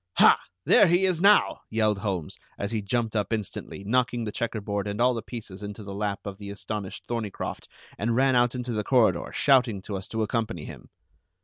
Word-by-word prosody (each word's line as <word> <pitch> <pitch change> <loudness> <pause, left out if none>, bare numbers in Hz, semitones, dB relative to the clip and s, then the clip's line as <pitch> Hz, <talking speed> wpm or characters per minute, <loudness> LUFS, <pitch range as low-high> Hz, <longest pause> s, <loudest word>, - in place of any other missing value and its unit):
"Ha! - - +7 0.3
There 205 - +6
he 175 +3 +3
is 180 -3 +1
now!" 205 +2 +5
yelled 110 -2 +1
Holmes, 95 -7 -3 0.2
as 100 +1 -3
he 110 -2 -1
jumped 115 +2 -1
up 105 -1 0
instantly, 105 -2 -4
knocking 120 +2 +1
the 105 - -3
checkerboard 105 -3 -3
and 100 +1 -4
all 125 +1 +4
the 115 - -3
pieces 105 -6 -8
into 105 +1 -7
the 100 -1 -7
lap 100 0 -2
of 100 -1 -6
the 100 -1 -7
astonished 100 -1 -6
Thorneycroft, 115 -4 -4 0.3
and 115 +2 0
ran 130 +1 +3
out 120 0 +3
into 125 -1 -3
the 105 -1 -1
corridor, 110 -8 +3
shouting 125 -7 +3
to 100 - -5
us 95 0 -5
to 110 -1 -2
accompany 110 -6 -2
him. - - -11
110 Hz, 200 wpm, -26 LUFS, 100-120 Hz, 0.3 s, Ha